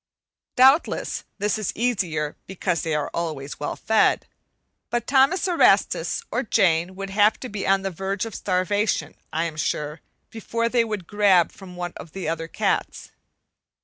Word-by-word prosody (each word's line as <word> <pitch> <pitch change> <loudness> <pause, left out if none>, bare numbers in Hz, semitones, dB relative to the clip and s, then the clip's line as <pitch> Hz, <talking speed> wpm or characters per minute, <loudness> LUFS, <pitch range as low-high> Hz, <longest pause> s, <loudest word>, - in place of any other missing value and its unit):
Doubtless, 265 +5 +3
this 210 +1 0
is 215 - -1
easier 180 -11 -1
because 180 -3 -1
they 160 -2 -1
are 150 -1 -2
always 155 -5 -4
well 145 - -3
fed, 220 0 +2 0.6
but 240 -1 -1
Thomas 275 +9 +3
Erastus 360 +5 +3
or 250 - 0
Jane 185 -6 +2
would 195 0 -6
have 205 +2 +3
to 255 - -5
be 205 -2 -4
on 195 0 +3
the 195 - -2
verge 195 +4 -3
of 225 - -7
starvation, 205 +3 0 0.2
I 160 +1 0
am 165 -2 -4
sure, 150 0 -2 0.3
before 230 +1 -2
they 235 -1 +3
would 215 -5 -4
"grab" 195 -3 +3
from 185 -2 -12
one 175 0 -5
of 160 - -11
the 190 -4 -5
other 165 0 -2
cats. - - -2
195 Hz, 160 wpm, -24 LUFS, 170-220 Hz, 0.6 s, Doubtless